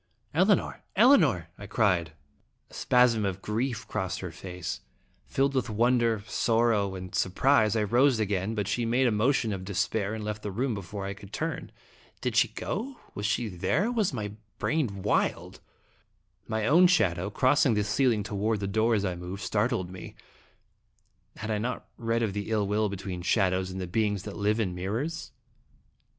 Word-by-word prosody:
"Elinor! 185 +4 +2
Elinor!" 170 - +5
I 100 - -8
cried. 90 -8 +1 0.6
A - - -18
spasm 125 -3 +3
of 95 -2 -2
grief 115 +2 -2
crossed 90 -3 -3
her 90 -2 -5
face. 90 +1 -6 0.5
Filled 135 +1 +1
with 130 -3 0
wonder, 115 -1 +2
sorrow, 110 -3 +1
and 90 0 -8
surprise, 110 +3 +3
I 110 - +2
rose 120 +4 +3
again, 100 0 -1
but 105 -3 -1
she 120 +3 0
made 120 +3 +2
a 120 - +3
motion 110 +1 +1
of 95 -1 -5
despair 100 +2 -1
and 110 - -5
left 105 0 -4
the 105 - -4
room 120 +6 -1
before 100 0 -6
I 100 - -3
could 100 0 -13
turn. - - -4 0.5
Did - - -2
she - - +5
go? 250 +6 -4 0.2
Was 105 0 -2
she 120 +1 0
there, 105 - 0
or 235 - 0
was 220 -6 +1
my 105 -6 -4 0.3
brain 120 -12 -1
wild? 105 - 0 0.9
My 110 -1 -1
own 170 +8 +6
shadow, 95 - +2
crossing 130 +2 +3
the 105 - +1
ceiling 110 0 +2
toward 105 +1 -1
the 100 - -3
door 110 +3 +2
as 100 -1 0
I 90 - -1
moved, 90 +3 -7
startled 105 -4 0
me. 90 -2 -9 1.2
Had 110 +1 -5
I 105 - 0
not 125 +4 -3
read 115 0 0
of 105 -4 -1
the 105 +1 -4
ill 110 -2 +1
will 105 +1 +1
between 95 -2 -5
shadows 95 0 +1
and 95 0 -6
the 95 - -3
beings 105 +1 0
that 105 - -7
live 105 +2 +1
in 95 -5 0
mirrors? 110 - -3
105 Hz, 175 wpm, -28 LUFS, 95-120 Hz, 1.2 s, own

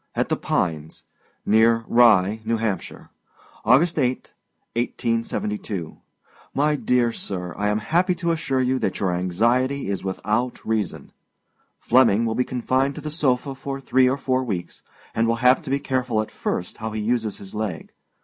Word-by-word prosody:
AT - - 0
THE - - +2
PINES. 80 -3 -2 0.4
NEAR 115 +1 +4
RYE, 110 -3 +4
N.H. 110 -4 -1 0.7
August 150 +8 +4
8, 130 -2 -1 0.4
1872. 115 - -2 0.6
My 150 +2 +2
Dear 125 -4 +2
Sir: 90 -5 -5
I 105 +1 -1
am 105 0 +1
happy 175 - +1
to 170 -1 -1
assure 145 -5 0
you 130 +1 +1
that - - -2
your 95 -2 +1
anxiety 115 +8 +1
is 100 - -3
without 105 +6 -2
reason. 110 -5 -2 0.7
Flemming 115 -3 +4
will 110 - 0
be 125 - +1
confined 130 +3 0
to 155 - -7
the 150 +1 -5
sofa 140 -3 0
for 135 +1 -5
three 130 -1 +3
or 135 - 0
four 130 -1 0
weeks, 95 -8 -5 0.3
and 115 0 +1
will 115 - +2
have 125 +5 +4
to 155 - -8
be 135 - +2
careful 130 -5 -1
at - - -12
first 90 - -3
how 110 -1 -4
he 110 0 -4
uses 115 -2 -1
his 95 -1 -10
leg. 105 -6 -4
120 Hz, 160 wpm, -23 LUFS, 105-130 Hz, 0.7 s, NEAR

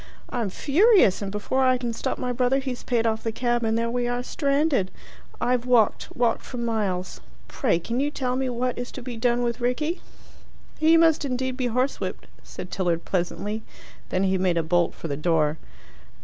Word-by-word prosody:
I'm 235 -5 -1
furious, 315 - +4
and 200 -1 -3
before 210 +6 0
I 255 -1 +4
can 240 -2 -3
stop 230 - -2
my 250 -1 -2
brother, 250 +2 +2
he's 260 -2 -3
paid 235 -2 0
off 220 -1 +1
the 225 - -2
cab 240 +1 0
and 225 0 +1
there 230 0 0
we 245 0 0
are 245 0 -1
stranded. 280 - +1 0.5
I've 245 0 0
walked 235 -4 +3
walked 235 -2 +1
for 250 - -8
miles. 210 -6 -2 0.3
Pray - - +1
can 230 +9 -3
you 285 +2 +1
tell 255 -4 -2
me 260 0 0
what 245 +1 -2
is 245 - -5
to 260 - -7
be 245 -1 -6
done 240 +1 +1
with 235 0 -2
Rickie?" 300 +8 -1 0.8
"He 320 +1 +6
must 325 -2 +4
indeed 260 -1 -2
be 255 -1 -1
horsewhipped," 250 +3 -2 0.2
said 180 - -9
Tilliard 175 -3 -1
pleasantly. 200 +4 -2 0.5
Then 185 +1 +1
he 190 -1 +2
made 180 -2 +2
a 165 - +2
bolt 175 +1 +1
for - - -6
the 145 - -2
door. 155 -1 +1
240 Hz, 190 wpm, -25 LUFS, 200-255 Hz, 0.8 s, He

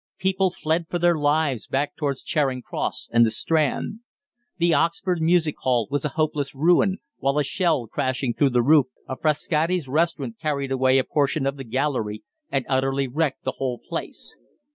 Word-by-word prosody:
People 190 0 +1
fled 165 -1 -1
for 175 - -1
their 175 0 +3
lives 145 -4 +1
back 140 +2 -1
towards 140 -3 -2
Charing 135 -4 0
Cross - - -4
and 115 0 +6
the 115 - +4
Strand. 155 - 0 0.6
The 170 -1 +3
Oxford 170 +3 +1
Music 160 -2 +3
Hall 120 -4 +1
was 145 - -1
a 150 - 0
hopeless 150 -3 -1
ruin, 175 +6 +3 0.2
while 140 +1 0
a 150 - +3
shell 145 -2 0
crashing 130 +2 -1
through 140 +2 +3
the 120 -2 +2
roof 145 0 +5 0.2
of 130 - -6
Frascati's 155 +1 +1
restaurant 165 - -1
carried 140 -3 -2
away 130 0 +3
a 130 - +3
portion 145 0 0
of 135 0 0
the 135 - -7
gallery 120 -4 -2 0.3
and 135 -2 -1
utterly 135 0 +1
wrecked 145 +2 -1
the - - -3
whole 130 -2 -1
place. - - -7
145 Hz, 175 wpm, -24 LUFS, 130-160 Hz, 0.6 s, and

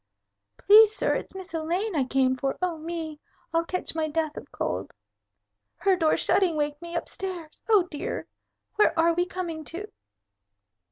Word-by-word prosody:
"Please, 430 +1 +7
sir, - - +1
it's - - -4
Miss 380 -1 -9
Elaine 345 +5 -1
I 275 -4 +2
came 260 0 +2
for. 270 +1 -2
Oh, 360 -2 0
me! 320 -2 -5 0.3
I'll 330 0 +3
catch 365 +2 -3
my 320 -1 0
death 310 0 -1
of - - -9
cold. - - -3 0.8
Her 390 -1 +2
door 325 -3 +2
shutting 365 -5 +2
waked 295 0 -1
me 340 0 -7
up 340 - -2
stairs. 355 -5 -7
Oh, 420 -4 +6
dear! 315 -4 -5 0.5
Where 345 -6 +4
are 335 +1 +4
we 350 +2 0
coming 345 -4 -4
to?" 380 +8 -6
335 Hz, 165 wpm, -26 LUFS, 310-370 Hz, 0.8 s, Please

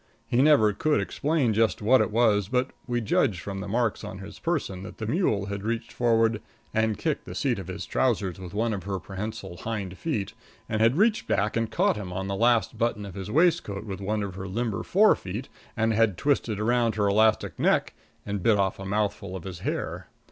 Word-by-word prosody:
He 120 +2 +2
never 135 -8 +5
could 150 +8 +1
explain 145 -6 0
just 110 -5 +2
what 120 +5 +4
it - - +1
was, 105 -3 +3
but 125 +4 0 0.2
we 120 -1 0
judged 105 -2 +1
from 95 +2 -5
the 100 - -5
marks 115 +1 0
on 95 - -6
his 95 +2 -10
person 145 - -2
that 100 +1 -9
the 110 - -4
mule 110 - +1
had 100 0 -4
reached 115 +2 -3
forward 115 -2 +2 0.3
and 110 -1 +1
kicked 155 -3 -2
the - - -8
seat 125 -7 0
of 95 - -7
his 95 +1 -5
trousers 100 -8 0
with 90 -2 -8
one 115 +1 +1
of 95 -2 -5
her 100 -1 -2
prehensile 95 -2 -6
hind 100 -2 -4
feet; 110 -11 -2 0.3
and 110 -1 -1
had 115 +6 +4
reached 215 +2 +2
back 100 +2 +1
and 115 -1 0
caught 110 - +2
him 95 -3 -6
on 95 +2 -3
the 100 - -2
last 115 -1 +2
button 115 -3 0
of 100 - -8
his 95 +1 -6
waistcoat 150 - +2
with 100 -2 -6
one 105 +2 -1
of 100 -2 -5
her 95 +1 -6
limber 110 +2 -2
fore 210 +3 +4
feet; 105 +8 -6 0.3
and 110 0 +2
had 110 -4 +2
twisted 120 -6 0
around 115 0 +2
her 105 -2 +1
elastic 110 +2 +2
neck - - +2 0.3
and 100 -1 -3
bit 110 +2 +4
off 95 -1 0
a 95 - -6
mouthful 100 -1 -1
of 90 - -6
his 95 -1 -7
hair. - - -3
110 Hz, 215 wpm, -26 LUFS, 100-120 Hz, 0.3 s, never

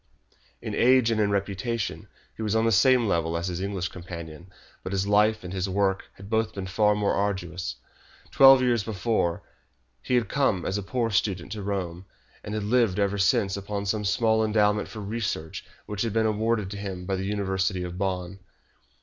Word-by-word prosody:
In - - -4
age 125 -1 +4
and 110 -1 +1
in 105 - +2
reputation, 100 +3 -2 0.3
he - - -8
was 110 0 0
on 110 0 +2
the 115 - +3
same 125 +3 +4
level 85 -3 0
as 85 +2 -2
his 90 0 -4
English 95 -2 -2
companion, 85 -1 -9 0.3
but 95 - -5
his 95 0 0
life 105 +1 +3
and 90 0 -6
his 95 0 -2
work 95 0 0
had 95 - -12
both 110 0 0
been 100 -1 -4
far 105 +2 +2
more 105 -1 +1
arduous. 95 -3 -2 0.6
Twelve 135 -1 +7
years 120 -4 +2
before, 105 -5 -1 0.6
he 125 - 0
had 120 -3 +2
come 125 -10 +1
as 95 +2 -1
a - - -3
poor 115 +3 -1
student 95 -3 -1
to 105 -1 -5
Rome, 95 -3 -4 0.4
and 105 - -5
had 105 - -2
lived 110 -3 +2
ever 100 0 0
since 95 +1 +2
upon 100 0 -4
some 105 +1 -1
small 110 +2 +2
endowment 105 -1 +2
for 110 - -8
research 100 -7 -4 0.2
which 105 -1 -4
had 115 -3 -1
been 110 0 +2
awarded 110 -2 0
to 100 - -5
him 95 -3 -5
by 95 +1 -1
the 95 +1 -3
University 95 -2 -1
of 90 +1 -6
Bonn. 95 -1 -3
100 Hz, 190 wpm, -26 LUFS, 95-110 Hz, 0.6 s, Twelve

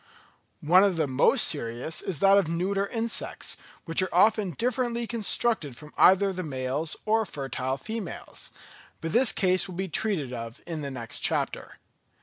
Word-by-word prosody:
One 180 +5 +6
of 200 -3 +2
the 160 - +2
most 130 0 +4
serious 120 +7 -1
is 175 -7 -2
that 195 0 +6
of 195 - -1
neuter 190 +4 -1
insects, 230 +1 -2 0.3
which 165 +2 +1
are 185 - -1
often 210 +2 +3
differently 240 +3 -1
constructed 220 - 0
from 150 -1 -12
either 195 +1 +5
the 185 - -4
males 140 +1 -2
or 220 +1 +2
fertile 135 -6 -4
females; 220 +1 -7 0.5
but 165 -1 -4
this 245 0 +5
case 185 -2 +2
will 185 - -9
be 190 +2 -3
treated 160 - -1
of 115 -1 -7
in 165 -3 -5
the 140 - -4
next 120 -4 -5
chapter. - - -2
180 Hz, 160 wpm, -27 LUFS, 145-210 Hz, 0.5 s, One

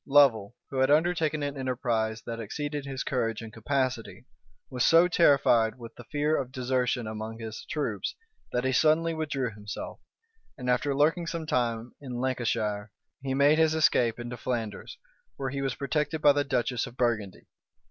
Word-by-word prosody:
Lovel, 120 -7 +4 0.2
who 135 - -4
had 130 +1 +4
undertaken 155 -1 +2
an 145 0 -2
enterprise 120 -4 -1
that 115 -1 -5
exceeded 145 +6 -4
his 135 -1 -3
courage 115 -3 -1
and 110 -1 -9
capacity, 125 -3 -2 0.4
was 125 -2 -1
so 165 +2 +6
terrified 130 -9 +4
with 115 -2 -10
the - - -12
fear 150 +1 0
of 130 -2 -3
desertion 125 -2 0
among 110 +1 -5
his 110 -1 -7
troops, 115 -10 -2 0.4
that 125 - 0
he 130 - +1
suddenly 160 +4 +3
withdrew 140 -6 -2
himself; 105 0 -7 0.6
and 125 -2 -1
after 135 +3 +1
lurking 165 +4 +2
some 165 -2 -3
time 120 -4 -1
in 130 -3 -6
Lancashire, 110 -5 -1 0.3
he 135 -1 -2
made 145 +3 +5
his 160 -1 +4
escape 120 -7 +3
into 120 +1 -6
Flanders, 115 -4 -4 0.4
where 135 +1 -3
he 140 0 -3
was 135 -2 -1
protected 150 +2 -1
by 145 -1 +6
the 145 0 +1
duchess 125 -2 -1
of 125 +1 -12
Burgundy. 110 -6 -1
130 Hz, 170 wpm, -28 LUFS, 115-145 Hz, 0.6 s, so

